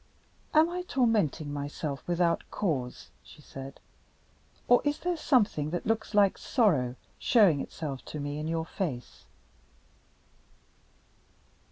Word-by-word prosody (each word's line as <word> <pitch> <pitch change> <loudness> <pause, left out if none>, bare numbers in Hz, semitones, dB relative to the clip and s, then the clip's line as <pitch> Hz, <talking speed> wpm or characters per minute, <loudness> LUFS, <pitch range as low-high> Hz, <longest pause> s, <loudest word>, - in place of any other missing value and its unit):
"Am 315 +1 +7
I 355 +1 -3
tormenting 220 - +1
myself 145 0 -4
without 175 -1 +1
cause?" 135 -11 -3
she - - -16
said. 135 -2 -10 0.9
"Or 245 - +6
is 290 0 0
there 355 0 -1
something 210 - +2
that 175 +2 -3
looks 220 -1 -1
like 200 -2 +4
sorrow, 150 - +2 0.2
showing 195 - +4
itself 140 -5 -6
to 150 - -6
me 145 +1 -4
in 155 - -3
your 165 0 -1
face?" 150 - -5
165 Hz, 120 wpm, -29 LUFS, 145-225 Hz, 0.9 s, Am